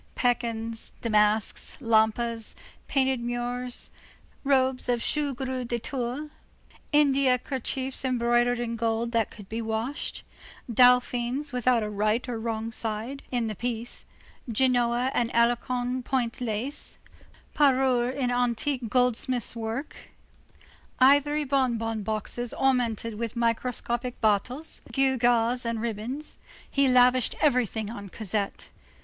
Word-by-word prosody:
Pekins, 230 Hz, -2 st, -1 dB
damasks, 210 Hz, -1 st, +1 dB
lampas, 230 Hz, -1 st, +1 dB, 0.3 s
painted 265 Hz, -2 st, +1 dB
moires, 245 Hz, +1 st, -1 dB, 0.5 s
robes 260 Hz, -2 st, +2 dB
of 240 Hz, -1 st, +2 dB
shot 290 Hz, +2 st, 0 dB
gros 255 Hz, -1 st, -3 dB
de 240 Hz, -, -1 dB
Tours, 260 Hz, +5 st, -4 dB, 0.6 s
India 275 Hz, -3 st, +4 dB
kerchiefs 265 Hz, +1 st, -2 dB
embroidered 240 Hz, -1 st, +2 dB
in 235 Hz, -1 st, -2 dB
gold 230 Hz, +1 st, -1 dB
that 230 Hz, -2 st, +1 dB
could 205 Hz, -3 st, -12 dB
be 225 Hz, +3 st, -4 dB
washed, 225 Hz, +5 st, -3 dB, 0.4 s
dauphines 250 Hz, +3 st, +3 dB
without 250 Hz, -2 st, +2 dB
a 210 Hz, -, -3 dB
right 215 Hz, +4 st, 0 dB
or 240 Hz, -2 st, -3 dB
wrong 225 Hz, 0 st, -3 dB
side, 225 Hz, +5 st, -4 dB
in 240 Hz, -2 st, -1 dB
the 220 Hz, -, -2 dB
piece, 235 Hz, +2 st, -3 dB, 0.5 s
Genoa 245 Hz, +1 st, +2 dB
and 240 Hz, 0 st, 0 dB
Alençon 245 Hz, +2 st, +1 dB
point 250 Hz, -1 st, -1 dB
lace, 245 Hz, +5 st, -1 dB, 0.6 s
parures 260 Hz, -3 st, +3 dB
in 250 Hz, -3 st, 0 dB
antique 245 Hz, +1 st, 0 dB
goldsmith's 250 Hz, 0 st, +1 dB
work, 230 Hz, +5 st, -4 dB, 1.0 s
ivory 285 Hz, +3 st, +4 dB
bon 260 Hz, -4 st, +1 dB
bon 225 Hz, -1 st, -3 dB
boxes 220 Hz, +3 st, -3 dB
ornamented 230 Hz, -4 st, 0 dB
with 230 Hz, 0 st, -3 dB
microscopic 240 Hz, +1 st, -1 dB
battles, 240 Hz, +8 st, 0 dB
gewgaws 245 Hz, -2 st, +2 dB
and 230 Hz, -1 st, -2 dB
ribbons—he 250 Hz, +5 st, -3 dB
lavished 250 Hz, -1 st, +4 dB
everything 235 Hz, -7 st, +1 dB
on 200 Hz, -3 st, -8 dB
Cosette. 205 Hz, 0 st, -3 dB
240 Hz, 115 wpm, -27 LUFS, 230-260 Hz, 1.0 s, India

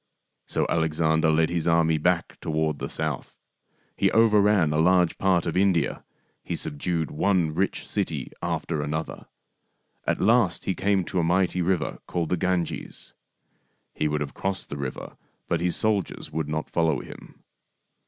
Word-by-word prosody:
So -, -, 0 dB
Alexander 80 Hz, 0 st, +2 dB
led 80 Hz, +1 st, +3 dB
his 85 Hz, -2 st, -1 dB
army 80 Hz, -1 st, +3 dB
back 90 Hz, +1 st, 0 dB
toward 80 Hz, -2 st, -1 dB
the -, -, -4 dB
south. 80 Hz, -4 st, -4 dB, 0.6 s
He -, -, +3 dB
overran 105 Hz, -7 st, +4 dB
a 75 Hz, -, +1 dB
large 90 Hz, +1 st, +4 dB
part 95 Hz, -3 st, +2 dB
of 85 Hz, -, -2 dB
India. 90 Hz, -4 st, +2 dB, 0.4 s
He -, -, -3 dB
subdued 80 Hz, +2 st, -2 dB
one 85 Hz, -2 st, +1 dB
rich 95 Hz, +4 st, -1 dB
city -, -, -2 dB
after 80 Hz, -3 st, -2 dB
another. 75 Hz, +2 st, -4 dB, 0.8 s
At -, -, +1 dB
last -, -, +3 dB
he 95 Hz, -, +1 dB
came 100 Hz, 0 st, +1 dB
to 90 Hz, -, -1 dB
a -, -, +2 dB
mighty 90 Hz, +1 st, +2 dB
river 90 Hz, -1 st, 0 dB
called 85 Hz, -3 st, -2 dB
the 90 Hz, -, +1 dB
Ganges. 90 Hz, -1 st, -2 dB, 0.8 s
He 75 Hz, -, 0 dB
would 75 Hz, 0 st, -1 dB
have 70 Hz, -, -4 dB
cpssed 95 Hz, 0 st, -3 dB
the 70 Hz, -, -5 dB
river, 70 Hz, -2 st, -6 dB, 0.3 s
but 85 Hz, -1 st, 0 dB
his 90 Hz, 0 st, +1 dB
soldiers 105 Hz, -4 st, -1 dB
would 80 Hz, -2 st, -2 dB
not 80 Hz, 0 st, -3 dB
follow 80 Hz, -4 st, +1 dB
him. -, -, -13 dB
85 Hz, 155 wpm, -25 LUFS, 80-90 Hz, 0.8 s, overran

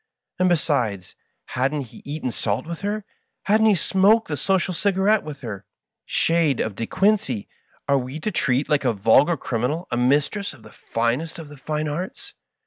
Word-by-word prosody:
And, 185 Hz, 0 st, +4 dB
besides, 125 Hz, -, 0 dB, 0.3 s
hadn't 135 Hz, 0 st, -1 dB
he -, -, -14 dB
eaten 145 Hz, -3 st, -3 dB
salt 105 Hz, +2 st, -2 dB
with 170 Hz, 0 st, -6 dB
her? 205 Hz, +1 st, -2 dB, 0.4 s
Hadn't 215 Hz, +2 st, +4 dB
he 210 Hz, -, +5 dB
smoked 200 Hz, +5 st, +3 dB
the 150 Hz, -, -1 dB
social 185 Hz, +5 st, 0 dB
cigarette 200 Hz, +3 st, +2 dB
with 145 Hz, -2 st, -8 dB
her? 105 Hz, -6 st, -6 dB, 0.4 s
Shade 165 Hz, -5 st, +2 dB
of 110 Hz, -, -1 dB
De 115 Hz, +3 st, -4 dB
Quincey 190 Hz, -, +1 dB, 0.4 s
I 140 Hz, -, +3 dB
are 140 Hz, -, +4 dB
we 130 Hz, +4 st, -6 dB
to 215 Hz, -, -1 dB
treat 135 Hz, -5 st, +1 dB
like 150 Hz, -1 st, +2 dB
a -, -, +2 dB
vulgar 125 Hz, -, +4 dB
criminal 130 Hz, +9 st, -2 dB
a 120 Hz, -, 0 dB
mistress 145 Hz, -, +1 dB
of 125 Hz, -6 st, -17 dB
the -, -, -14 dB
finest 120 Hz, +8 st, -2 dB
of 160 Hz, -3 st, -9 dB
the 145 Hz, -, -12 dB
fine 155 Hz, +2 st, -3 dB
arts? 170 Hz, +6 st, -5 dB
150 Hz, 180 wpm, -23 LUFS, 125-185 Hz, 0.4 s, he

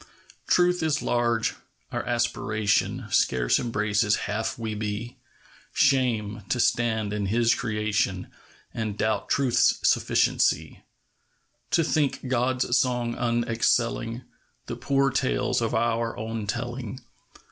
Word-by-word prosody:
Truth 180 Hz, 0 st, +3 dB
is 155 Hz, -2 st, 0 dB
large. 120 Hz, -2 st, +1 dB, 0.4 s
Our -, -, -2 dB
aspiration 105 Hz, +2 st, 0 dB
Scarce 65 Hz, -7 st, +2 dB
embraces 105 Hz, -2 st, +1 dB
half 110 Hz, +2 st, -2 dB
we 110 Hz, -2 st, -4 dB
be. 105 Hz, +3 st, -4 dB, 0.6 s
Shame! 120 Hz, -7 st, +1 dB
to 125 Hz, -, 0 dB
stand 110 Hz, -3 st, +1 dB
in 105 Hz, -1 st, -2 dB
His 115 Hz, +3 st, +3 dB
creation 105 Hz, -5 st, -1 dB, 0.5 s
And 110 Hz, -2 st, -3 dB
doubt 110 Hz, -1 st, -1 dB
Truth's 135 Hz, -4 st, +3 dB
sufficiency! -, -, +1 dB, 0.9 s
To 165 Hz, -, +3 dB
think 150 Hz, -4 st, 0 dB
God's 125 Hz, 0 st, +1 dB
song 120 Hz, -2 st, 0 dB
unexcelling 120 Hz, 0 st, 0 dB, 0.4 s
The -, -, -5 dB
poor 135 Hz, 0 st, +1 dB
tales 130 Hz, -2 st, 0 dB
of 115 Hz, -, -1 dB
our 115 Hz, 0 st, 0 dB
own 110 Hz, -1 st, -4 dB
telling. 120 Hz, +2 st, -4 dB
115 Hz, 110 wpm, -26 LUFS, 105-125 Hz, 0.9 s, Truth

